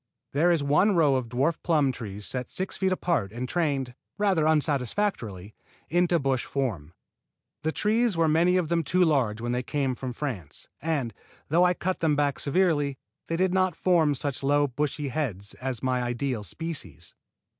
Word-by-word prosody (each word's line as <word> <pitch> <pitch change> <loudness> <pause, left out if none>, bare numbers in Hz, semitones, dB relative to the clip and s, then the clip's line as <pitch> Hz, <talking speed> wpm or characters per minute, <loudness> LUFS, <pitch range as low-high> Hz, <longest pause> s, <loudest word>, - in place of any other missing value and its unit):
There 165 +5 +3
is 165 -4 +2
one 165 +9 +3
row 155 -5 +4
of 125 -3 -2
dwarf 140 +7 0
plum 150 -6 +2
trees 105 -4 -6
set 125 -1 -2
six 190 +1 -3
feet 190 -1 +1
apart 170 - 0
and 120 +3 -4
trained, 140 -6 -1 0.2
rather 190 -7 +2
unsatisfactorily, 140 - 0 0.4
into 175 +2 +3
bush 135 -4 0
form. 95 - -3 0.7
The 160 +1 0
trees 215 +1 +1
were 165 -1 +3
many 170 +4 +3
of 170 -4 0
them 170 -1 +1
too 180 +5 +3
large 125 -9 +1
when 120 +1 -2
they 125 0 0
came 135 +1 -1
from 125 0 -5
France, 120 - -5
and, 145 -8 -1 0.4
though 170 +4 +4
I 180 0 +3
cut 185 +2 -2
them 155 -3 +2
back 145 -1 0
severely, 145 -3 +1 0.3
they 165 - -1
did 185 +1 +1
not 185 -3 +2
form 165 -5 +3
such 140 0 -3
low 145 +1 +3
bushy 145 +2 -2
heads 110 - -3
as 130 -3 -3
my 130 -1 +1
ideal 120 -1 -2
species. 135 - -5
145 Hz, 175 wpm, -27 LUFS, 125-170 Hz, 0.7 s, row